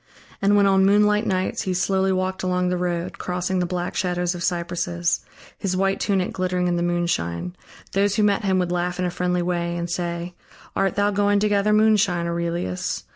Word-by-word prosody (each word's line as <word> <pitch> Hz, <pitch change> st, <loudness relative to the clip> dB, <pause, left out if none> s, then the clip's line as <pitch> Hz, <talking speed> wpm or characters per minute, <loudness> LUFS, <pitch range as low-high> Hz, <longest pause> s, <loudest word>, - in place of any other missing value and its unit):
And 205 Hz, +1 st, +4 dB
when 200 Hz, -, +5 dB
on 195 Hz, -1 st, +4 dB
moonlit 210 Hz, +2 st, +3 dB
nights 185 Hz, 0 st, -1 dB
he 185 Hz, -1 st, -2 dB
slowly 190 Hz, +1 st, +1 dB
walked 185 Hz, 0 st, -1 dB
along 180 Hz, -1 st, 0 dB
the 180 Hz, -, 0 dB
road, 175 Hz, 0 st, -3 dB
crossing 180 Hz, +1 st, -2 dB
the 180 Hz, -, 0 dB
black 180 Hz, 0 st, -3 dB
shadows 180 Hz, -1 st, 0 dB
of 175 Hz, -, -7 dB
cypresses, 175 Hz, 0 st, -1 dB, 0.4 s
his 185 Hz, -2 st, -1 dB
white 195 Hz, +1 st, +1 dB
tunic 195 Hz, -3 st, 0 dB
glittering 180 Hz, -1 st, 0 dB
in 175 Hz, -, +1 dB
the 170 Hz, -, -1 dB
moonshine, 175 Hz, -, -1 dB, 0.4 s
those 200 Hz, +1 st, +1 dB
who 215 Hz, -, +2 dB
met 205 Hz, +1 st, +2 dB
him 190 Hz, -2 st, +2 dB
would 180 Hz, -1 st, 0 dB
laugh 180 Hz, 0 st, -1 dB
in 180 Hz, -, -1 dB
a 180 Hz, -, -1 dB
friendly 180 Hz, 0 st, 0 dB
way 175 Hz, -1 st, -1 dB
and 170 Hz, 0 st, -3 dB
say: 175 Hz, 0 st, -3 dB, 0.4 s
"Art 195 Hz, -1 st, +1 dB
thou 205 Hz, 0 st, +2 dB
going 205 Hz, 0 st, +2 dB
to 210 Hz, -, +2 dB
gather 205 Hz, +1 st, +2 dB
moonshine, 210 Hz, -5 st, +3 dB
Aurelius? 170 Hz, -, -2 dB
180 Hz, 195 wpm, -23 LUFS, 175-195 Hz, 0.4 s, when